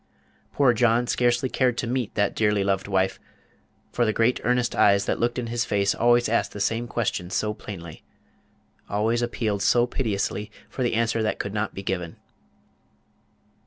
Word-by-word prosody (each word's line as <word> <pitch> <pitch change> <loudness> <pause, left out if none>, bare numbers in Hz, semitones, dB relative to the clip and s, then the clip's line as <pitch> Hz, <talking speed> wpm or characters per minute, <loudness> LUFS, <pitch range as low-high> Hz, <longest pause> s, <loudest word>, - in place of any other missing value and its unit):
Poor 135 -4 +4
John 120 +1 +2
scarcely 120 +1 +1
cared 125 -2 +1
to - - -1
meet 120 -1 -2
that 105 -2 +1
dearly 105 -2 +1
loved 95 -1 0
wife; 95 -1 0 0.7
for 120 - +1
the 110 - +2
great 115 +3 +2
earnest 125 +1 +1
eyes 100 0 +4
that - - -1
looked 120 +1 0
in 125 - -2
his 115 0 -1
face 100 -2 +1
always 120 +1 +3
asked 115 +2 0
the 105 - -7
same 115 +4 -1
question 105 -7 -2
so 105 +3 -1
plainly 85 -7 -9 0.9
always 110 +3 +1
appealed 110 -4 -1
so 120 +4 +4
piteously 105 -3 -2 0.2
for - - -6
the 120 -2 +1
answer 115 0 +1
that 110 - -1
could 100 - -4
not 105 0 -2
be 100 - -6
given. 90 -4 -3
115 Hz, 170 wpm, -25 LUFS, 100-120 Hz, 0.9 s, Poor